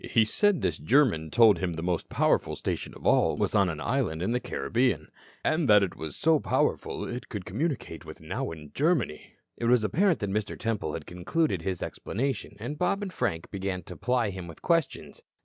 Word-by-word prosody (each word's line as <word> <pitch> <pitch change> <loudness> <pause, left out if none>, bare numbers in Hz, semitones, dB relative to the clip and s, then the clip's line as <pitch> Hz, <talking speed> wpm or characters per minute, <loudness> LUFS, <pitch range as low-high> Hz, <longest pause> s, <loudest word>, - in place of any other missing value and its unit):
And - - -7
he 115 -3 +4
said 205 - +2
this - - -1
German 115 - +3
told 110 +3 +6
him 90 -2 -1
the 80 0 -5
most 90 -1 -1
powerful - - +2
station - - -4
of - - -13
all - - +4
was - - 0
on - - +4
an - - -4
island 80 +2 -1
in 95 - 0
the 125 - +1
Caribbean, 125 +1 -1 0.3
and 155 -4 +1
that 105 -1 +7
it 95 - -2
was 80 -2 -6
so 160 0 +3
powerful - - 0
it 125 - -6
could 105 -6 -5
communicate 120 - -3
with - - -10
Nauen, 75 -3 -5
Germany." 150 - 0 0.2
It 120 - -3
was 120 -1 +4
apparent 170 - +3
that 100 -1 -1
Mr. 105 +1 -2
Temple 110 -9 -2
had 80 - -6
concluded 95 - -1
his 90 +1 -3
explanation, 130 -2 -3
and 145 +8 -5
Bob 195 +3 +1
and 190 -2 -5
Frank 80 - -2
began 95 -2 -3
to - - -9
ply 125 -4 0
him 95 -2 -7
with 85 - -12
questions. 165 -4 0
110 Hz, 200 wpm, -28 LUFS, 90-145 Hz, 0.3 s, that